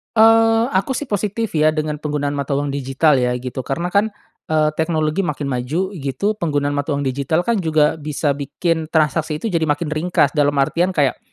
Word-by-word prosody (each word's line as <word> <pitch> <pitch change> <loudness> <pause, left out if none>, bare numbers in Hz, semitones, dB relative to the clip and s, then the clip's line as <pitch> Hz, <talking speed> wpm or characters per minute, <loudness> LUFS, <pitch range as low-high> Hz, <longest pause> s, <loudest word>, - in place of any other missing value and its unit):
Eee, 225 0 +5
aku 195 +8 0
sih - - -2
positif 210 +2 -1
ya 155 0 +3
dengan 155 -1 -2
penggunaan 145 -1 -2
mata 140 -1 -2
uang 145 0 -1
digital 135 +1 +2
ya 125 0 +1
gitu 125 +1 -5
karena 170 +6 -2
kan, 205 +2 +3 0.4
eee, 155 -1 +2
teknologi 160 +1 0
makin 150 -5 -2
maju 150 +11 -2
gitu 195 +7 -2
penggunaan 145 -4 0
mata 145 +1 -1
uang 140 - -2
digital 140 +6 0
kan 230 -1 +1
juga 155 -2 +2
bisa 150 0 -1
bikin 155 +3 -2
transaksi 155 - 0
itu 220 - -1
jadi 165 -2 0
makin 150 +1 -1
ringkas 170 +4 +1
dalam 145 -2 +1
artian 170 +7 +1
kayak, 140 -4 +1
155 Hz, 185 wpm, -19 LUFS, 145-175 Hz, 0.4 s, Eee